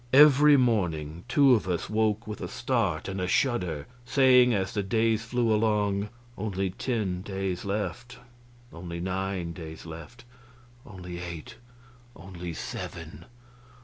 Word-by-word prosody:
Every 145 +1 +8
morning 90 - 0
two 140 +1 +5
of 110 -5 +1
us 90 -2 -1
woke 110 +1 0
with 105 0 -7
a - - -3
start 115 -10 -1
and 95 -1 -3
a 90 - -1
shudder, 90 - 0 0.2
saying, 125 -1 +5
as 95 -4 -1
the 105 - 0
days 110 +2 +1
flew 120 -1 +1
along, 105 -2 +1 0.3
"Only 95 -2 -2
ten 100 -4 -2
days 95 -2 -3
left;" 120 +5 -3 0.6
"only 85 0 -6
nine 95 -1 -3
days 80 -1 -9
left;" 85 +10 -10 0.6
"only 90 -4 -8
eight;" 85 -3 -7 0.6
"only 90 0 -7
seven." 80 - -7
100 Hz, 130 wpm, -27 LUFS, 90-115 Hz, 0.6 s, Every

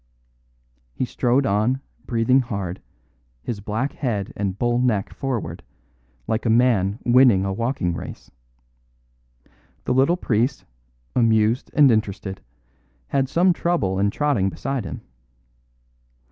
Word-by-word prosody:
He 130 - -1
strode 125 +2 +1
on, 110 +6 +1 0.3
breathing 120 +2 +3
hard, 100 -8 -4 0.6
his 115 -4 -4
black 110 +7 -2
head 105 -8 -3
and 100 -2 -2
bull 120 +2 +1
neck 115 -6 0
forward, 115 -12 -4 0.6
like 110 - -1
a 115 - 0
man 110 -4 +3
winning 120 -6 +5
a 95 - -1
walking 115 -5 -1
race. - - -8 1.5
The - - +1
little 135 +7 +3
priest, 125 -3 0 0.5
amused 115 0 +2
and 145 -4 +6
interested, 100 -3 -2 0.7
had 135 -2 0
some 180 +4 +3
trouble 105 - 0
in 100 +1 +2
trotting 125 -6 +1
beside 135 +2 -4
him. - - -6
115 Hz, 120 wpm, -22 LUFS, 100-130 Hz, 1.5 s, and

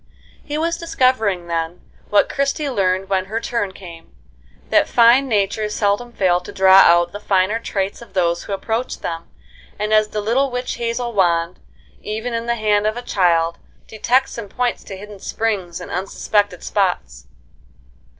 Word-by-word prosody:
He 295 0 -4
was 335 +2 0
discovering 255 - +1
then, 165 0 -3 0.3
what 205 - +4
Christie 280 +1 -1
learned 190 -4 0
when 190 -1 0
her 220 +4 -3
turn 230 -4 -2
came, 170 - -13 0.6
that - - +4
fine 240 +3 +5
natures 210 -1 0
seldom 205 +4 0
fail 185 -5 +2
to 180 - -10
draw 190 0 +6
out 175 -1 +5
the 205 - -7
finer 200 +2 +1
traits 195 -2 -3
of 235 - -14
those 170 -2 0
who - - -7
approach 225 +5 -3
them, 165 0 -5 0.5
as 215 0 +3
the 210 - -4
little 240 +7 +1
witch 250 -1 -4
hazel 235 0 -2
wand, 170 -3 +1 0.4
even 220 +3 -4
in 230 0 -3
the 235 - +1
hand 210 -2 +1
of 215 +2 -1
a 245 - -5
child, 170 -6 +1 0.3
detects 245 +4 0
and 210 -3 -7
points 245 +3 -2
to 195 - -8
hidden 205 0 -11
springs 190 -5 -2
in 180 - -9
unsuspected 195 +1 -1
spots. 125 - -2
205 Hz, 160 wpm, -20 LUFS, 185-235 Hz, 0.6 s, draw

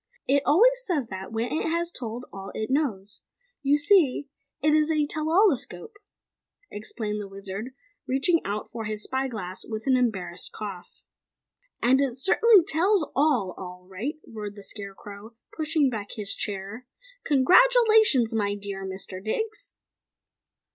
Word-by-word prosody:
"It 280 +1 +3
always - - +5
says 300 - -1
that, 190 +1 -7
when 225 +2 -2
it 315 - -1
has 340 +1 -1
told 240 -2 -6
all 195 0 -8
it 220 +3 -3
knows. 215 -9 -1 0.4
You 285 +1 +3
see, 290 -4 +3 0.3
it 300 +1 +2
is 305 0 +3
a 305 -2 +2
'tell 310 +1 -3
all 390 +4 +5
escope.'" 425 - -5 0.7
explained 210 0 -3
the 200 - -7
Wizard, 195 +5 -6 0.3
reaching 300 +6 +2
out 205 +1 -4
for 225 -1 -5
his 210 0 -2
spy 265 +1 -1
glass 190 -7 -5
with 220 -1 -6
an 265 -1 +3
embarrassed 190 -8 -1
cough. 195 -4 -8 0.8
"And 260 +3 +4
it 265 -3 -1
certainly 390 - +5
tells 350 +2 +2
ALL, 265 -10 +2
all 180 -1 -9
right!" 215 - -4
roared 210 -2 -7
the 205 - -10
Scarecrow, 200 +2 -9 0.2
pushing 310 -2 +1
back 215 -5 -4
his 205 -2 -3
chair. 205 +5 -5 0.4
"Congratulations, 395 - +5
my 205 -2 0
dear 200 -1 -6
Mr. 190 0 -5
Diggs!" 440 - -4
245 Hz, 145 wpm, -26 LUFS, 205-305 Hz, 0.8 s, always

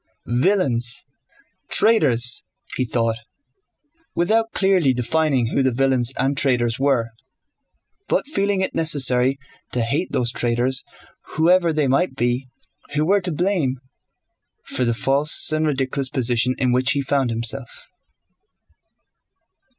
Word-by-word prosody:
Villains! 125 - 0 0.6
Traitors!" 130 - +3 0.3
he 130 - -1
thought, 115 -1 -1 1.0
without 225 +6 +1
clearly 185 -9 +2
defining 125 0 0
who - - +2
the 130 - +2
villains 130 -1 +1
and 135 +2 0
traitors 120 -4 +1
were, 130 -5 0 1.0
but - - 0
feeling 200 -8 0
it 190 - -2
necessary 135 -4 +2 0.3
to 125 - -1
hate 145 +10 -2
those 120 -1 0
traitors 120 +2 0 0.5
whoever 170 +2 +3
they 150 -3 0
might 135 +3 0
be 125 +1 -1 0.5
who 150 +1 +1
were 200 +4 +2
to 180 -1 -3
blame 170 -5 0 0.9
for 125 - -1
the 120 -1 0
false 140 +8 +3
and 155 0 0
ridiculous 135 -1 -1
position 125 -2 0
in 125 -1 +1
which 130 +2 +2
he 140 -1 -1
found 135 -2 0
himself. 115 +2 -2
135 Hz, 120 wpm, -21 LUFS, 125-155 Hz, 1.0 s, Traitors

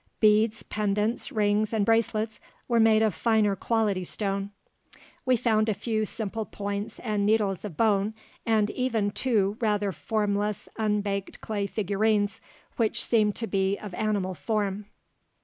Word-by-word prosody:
Beads, 215 +1 +3
pendants, 210 +2 -1
rings, 210 0 +1
and 215 -3 +1
bracelets 220 -1 +1 0.3
were 235 -2 +2
made 220 -1 +5
of 215 -3 +2
finer 215 0 +2
quality 210 -2 0
stone. 195 +1 -2 0.8
We 255 -1 +4
found 220 -1 +2
a 210 - +1
few 215 0 -1
simple 220 +1 -3
points 205 0 -5
and 210 -3 -1
needles 205 -3 +1
of 200 -7 -7
bone, 210 -1 +2 0.3
and 215 -2 +2
even 230 -6 0
two 210 -4 +1
rather 205 -3 +1
formless 210 +1 -1
unbaked 205 -2 -1
clay 205 -2 -2
figurines 205 +1 0 0.4
which 225 -3 +1
seemed 215 -3 +2
to 230 - -3
be 195 -1 0
of 210 -3 -8
animal 205 -2 -1
form. 200 +4 -2
210 Hz, 140 wpm, -27 LUFS, 200-220 Hz, 0.8 s, made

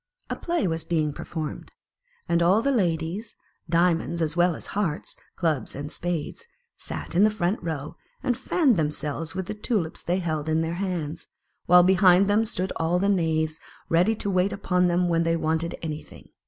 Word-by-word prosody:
A - - 0
play 340 - -1
was 165 -1 -2
being 155 -3 0
performed, 155 0 -6 0.6
and 170 -1 +2
all 190 +6 +4
the 280 - +2
ladies, 180 - -1 0.3
Diamonds 170 0 +2
as 160 -1 -1
well 175 -1 +3
as - - -5
Hearts, 190 -7 -2 0.2
Clubs 160 -6 -1
and 145 +2 -5
Spades, 175 - -4 0.3
sat - - -6
in 180 +4 +4
the 215 - +6
front 205 -1 -1
row, 155 -4 -5 0.3
and 245 - +1
fanned 275 - +2
themselves 150 +1 -2
with 190 -1 -2
the 210 - -4
tulips 210 -6 -2
they 175 +2 0
held 160 -4 -2
in 160 +1 +2
their 165 +1 -2
hands, 170 -5 -3 0.4
while 180 0 +8
behind 185 +1 +5
them 210 +2 +3
stood 190 -4 -2
all 165 +2 +1
the 200 +2 +1
knaves 160 -4 +1 0.3
ready 180 +7 +3
to 200 -1 -3
wait 185 +1 +2
upon 180 -2 +1
them 175 +1 +2
when 165 -1 +2
they 165 0 +1
wanted 160 +1 -1
any 155 -1 -3
thing. - - -15
175 Hz, 180 wpm, -25 LUFS, 160-190 Hz, 0.6 s, while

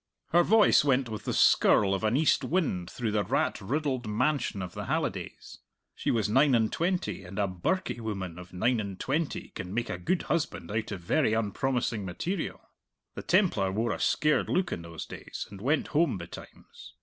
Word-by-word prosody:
Her 175 - +5
voice 215 0 +5
went 135 -3 +2
with 110 -1 -6
the - - -1
skirl 100 -1 +4
of 95 - -2
an 110 +4 +2
east 155 +1 +3
wind 135 - -1
through 115 -3 -3
the 105 -1 +1
rat - - 0
riddled 130 +1 -2
mansion 110 -2 0
of 90 - -7
the - - -5
Hallidays. - - -3 0.3
She - - -3
was 110 -3 +2
nine 135 +5 +4
and 110 -2 +2
twenty, 180 +2 -1
and 90 +3 -10
a 100 -1 +2
birkie 95 - -2
woman 95 -6 -5
of 90 0 -11
nine 115 +6 +1
and 100 -3 -5
twenty 150 +3 -2
can 90 - -7
make 120 0 -1
a 90 - -4
good 170 - 0
husband 165 -9 -2
out 110 +1 -2
of 95 -4 -5
very 120 - +2
unpromising 115 +1 -1
material. 160 - -3 0.5
The - - -6
Templar 170 - +2
wore 110 +3 0
a - - -3
scared 150 0 +2
look 185 -1 +1
in - - -3
those 85 -1 -7
days - - -7
and 100 -1 -10
went 145 +7 +1
home 150 - +2
betimes. 85 -1 -12
115 Hz, 190 wpm, -29 LUFS, 95-150 Hz, 0.5 s, Her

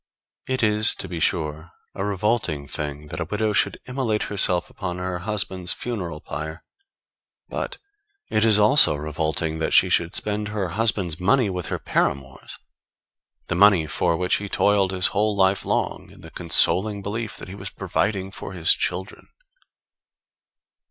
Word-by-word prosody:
It 130 -2 -1
is, 105 0 +5
to - - -5
be 85 -2 -5
sure, 80 +2 -1 0.2
a 95 - -4
revolting 100 -7 -1
thing 75 +1 -5
that - - -5
a 80 - -2
widow 105 +4 -1
should - - +1
immolate 125 -5 -1
herself 90 -3 0
upon 90 -1 -5
her 90 -1 -3
husband's 95 -2 -1
funeral 90 -10 -5
pyre; 80 +2 -6 0.9
but - - -4 0.5
it 110 0 +1
is 110 -2 +5
also 105 - +5
revolting 80 +2 -2
that 80 - 0
she - - +6
should 85 0 +1
spend 105 0 -1
her 105 -3 -3
husband's 100 -5 -1
money 105 +3 +2
with 90 -3 -4
her - - -2
paramours 70 -1 -2 0.9
the - - -3
money 95 -3 +5
for 80 +2 0
which 90 +1 +1
he 100 0 -6
toiled 100 -1 +2
his 90 -1 0
whole 105 +1 +1
life 95 0 +2
long, - - -2
in - - -16
the - - -12
consoling 95 +4 +2
belief 110 +2 -4
that - - -8
he 90 - -8
was 100 -1 -7
providing 95 0 -2
for 95 - -8
his 85 -3 +3
children. 95 +2 -4
95 Hz, 160 wpm, -23 LUFS, 85-105 Hz, 0.9 s, she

